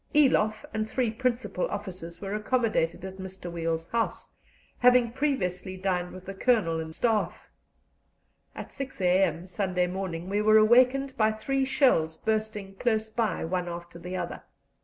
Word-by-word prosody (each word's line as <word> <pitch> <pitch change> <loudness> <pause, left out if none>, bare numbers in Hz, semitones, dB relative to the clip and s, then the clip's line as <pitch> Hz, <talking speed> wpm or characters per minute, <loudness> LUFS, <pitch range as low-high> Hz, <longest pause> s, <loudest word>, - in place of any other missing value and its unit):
Eloff 220 -7 +3
and 220 0 -2
three 245 -2 0
principal 240 -5 -1
officers 185 -4 -7
were 195 0 -5
accommodated 215 -6 0
at 190 0 -7
Mr. 190 -2 -7
Weil's 165 -1 -2
house, 230 -1 -2 0.5
having 250 -1 +5
previously 190 -9 -1
dined 180 -2 -1
with 185 0 -11
the 195 - -6
Colonel 195 -6 +2
and 160 0 -6
Staff. 225 -3 -1 1.0
At - - -8
6 275 -4 -6
a.m. 180 -2 +2
Sunday 185 -1 0
morning 180 -2 -4
we 205 +2 0
were 215 0 +6
awakened 255 +5 +4
by 220 -1 +4
three 270 +5 -1
shells 250 - +2
bursting 215 -3 -2
close 220 -2 0
by, 220 -6 -1
one 180 +1 -2
after 170 0 -8
the 180 +2 -5
other. - - -4
200 Hz, 150 wpm, -28 LUFS, 180-230 Hz, 1.0 s, were